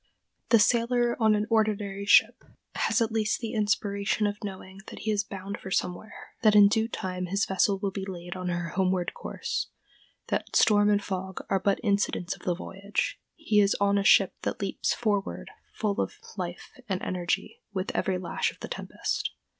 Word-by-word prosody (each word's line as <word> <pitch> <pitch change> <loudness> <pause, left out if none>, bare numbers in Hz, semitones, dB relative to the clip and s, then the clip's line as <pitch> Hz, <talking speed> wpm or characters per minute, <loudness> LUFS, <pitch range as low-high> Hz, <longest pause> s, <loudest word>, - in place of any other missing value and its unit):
The 230 - +7
sailor 240 +2 +3
on 220 -1 +5
an 210 0 0
ordinary 205 -3 0
ship - - +5 0.3
has 235 - +2
at 225 - -2
least 215 -1 0
the 230 -2 -4
inspiration 210 -1 0
of 205 +1 -2
knowing 190 -1 -7
that - - -9
he 220 - -1
is 205 -1 +1
bound 200 0 -7
for 190 - -8
somewhere; 185 +3 -3
that 215 -3 +5
in 205 -1 +8
due 220 +1 +1
time 185 -4 -4
his 200 +3 +1
vessel 195 +1 +2
will 195 0 -2
be 190 0 -4
laid 175 -2 -6
on 185 -1 -3
her 175 -1 -2
homeward 185 -1 0
course; - - -4 0.6
that - - -2
storm 205 -1 +5
and 205 -1 +2
fog 190 -1 -5
are 195 - +3
but 195 +1 +1
incidents 200 -3 0
of - - -18
the 180 - 0
voyage: 195 +3 -3 0.2
he 220 -11 +2
is 200 -1 +4
on 200 0 +3
a - - 0
ship - - +5
that - - -3
leaps - - -1
forward 210 -3 -1 0.2
full 210 -1 -1
of - - -3 0.2
life - - -5 0.2
and 190 -1 0
energy 175 -1 -2
with 190 -2 -2
every 190 -1 0
lash 180 -1 -1
of - - -20
the - - -5
tempest. - - -3
200 Hz, 185 wpm, -28 LUFS, 190-215 Hz, 0.6 s, in